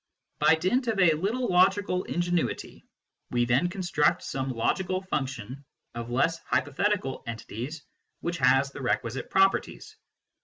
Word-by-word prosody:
By 160 - +5
dint 230 +11 0
of 220 -3 0
a 175 -4 +6
little 215 +11 -1
logical 185 0 +2
ingenuity, 175 -1 -2 0.5
we 120 0 +1
then 130 +9 +2
construct 175 -2 +1
some 135 0 -3
logical 185 +10 -1
function 135 - -4 0.3
of 120 0 -6
less 165 +7 +1
hypo 145 -3 -1
thetical 190 -4 -1
entities 115 +6 -6 0.4
which 170 0 -3
has 135 +2 +4
the 140 - -8
requisite 120 0 -2
properties. 195 0 +1
165 Hz, 130 wpm, -27 LUFS, 130-185 Hz, 0.5 s, a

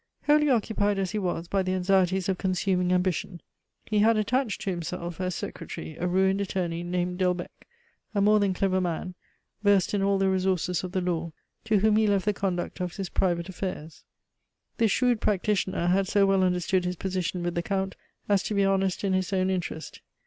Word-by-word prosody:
Wholly 300 0 +4
occupied 210 -4 +1
as 190 -2 -1
he 215 - -1
was 175 -3 -2
by 195 +1 +1
the 185 0 -1
anxieties 185 0 +2
of 190 -2 -1
consuming 185 -1 0
ambition, 180 -1 0 0.5
he 210 -1 0
had 220 +1 +4
attached 225 +2 0
to 195 - -1
himself, 170 0 -5
as 185 -1 -2
secretary, 160 -2 -6
a 180 - 0
ruined 190 +2 +2
attorney 180 -3 -2
named 180 +1 -2
Delbecq, 180 -1 0 0.6
a - - +2
more 210 +1 +5
than 195 -2 +1
clever 185 0 +1
man, 180 +1 -3 0.5
versed 205 -3 +3
in 205 - +1
all 200 0 +2
the 195 0 +2
resources 185 -2 0
of 180 0 -6
the 185 - 0
law, 170 -2 -2 0.3
to 215 -3 +2
whom 215 0 +4
he 220 0 +3
left 200 -2 +1
the 210 - +2
conduct 185 -3 -3
of 180 -1 -3
his 195 -3 -4
private 170 -2 0
affairs. 180 -4 -6 0.7
This 225 -1 +3
shrewd 245 0 +2
practitioner 195 -2 0
had 190 +2 +2
so 200 0 +3
well 195 -1 +3
understood 180 +1 +1
his 180 0 -2
position 185 -1 -2
with 175 0 -1
the 170 - -1
Count 190 +1 -2 0.3
as 200 -2 +3
to 210 - -3
be 200 0 +3
honest 195 -1 +1
in 195 -1 +1
his 185 0 0
own 190 -1 +1
interest. 175 -3 -4
190 Hz, 195 wpm, -27 LUFS, 180-200 Hz, 0.7 s, more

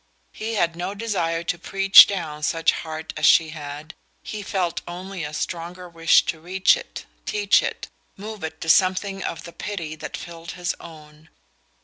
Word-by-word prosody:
He 225 +1 -4
had 170 -4 +1
no 180 +3 -4
desire 175 -7 -1
to 170 +1 -2
"preach 195 +2 +8
down" 160 -6 -4
such 165 +2 +2
heart 160 -1 -6
as - - +3
she 160 -1 +6
had 150 0 -8 0.3
he 215 - -6
felt 185 -4 -2
only 185 0 -6
a 150 - -5
stronger 175 +3 -5
wish 165 -1 +4
to 160 - -3
reach 185 +4 +3
it, - - -9 0.2
teach 205 -1 +3
it, - - -4 0.3
move 210 0 -8
it 160 0 -5
to - - -5
something 190 +2 +3
of - - -4
the 170 - -10
pity 170 -7 -5
that 155 - -7
filled 170 -1 -9
his 175 -1 -2
own. 155 -1 -14
170 Hz, 170 wpm, -23 LUFS, 160-195 Hz, 0.3 s, preach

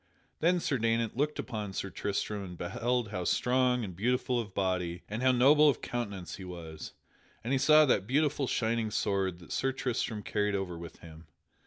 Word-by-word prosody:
Then 175 +3 +3
Sir 150 -7 -1
Daynant 115 0 0
looked 150 +4 0
upon 105 -3 -4
Sir 100 0 -4
Tristram 100 0 -2
and 90 -2 -8
beheld 115 +7 -1
how 90 -3 -3
strong 125 +4 +2
and 95 -5 -6
beautiful 125 +4 0
of 110 -4 -5
body 90 -3 -1
and 110 +3 -4
how 130 0 +5
noble 145 +5 +6
of 140 - -1
countenance 100 -8 -4
he 95 - -9
was, 85 -3 -8 0.5
and 120 +4 -1
he 135 - +2
saw 155 +3 +7
that 100 -8 +1
beautiful 145 +1 +1
shining 115 -1 0
sword 95 -4 0
that 85 - -14
Sir 135 - 0
Tristram 125 -5 -2
carried 105 0 0
ever 95 -3 -3
with 85 0 -10
him. 80 -1 -13
110 Hz, 185 wpm, -30 LUFS, 95-130 Hz, 0.5 s, saw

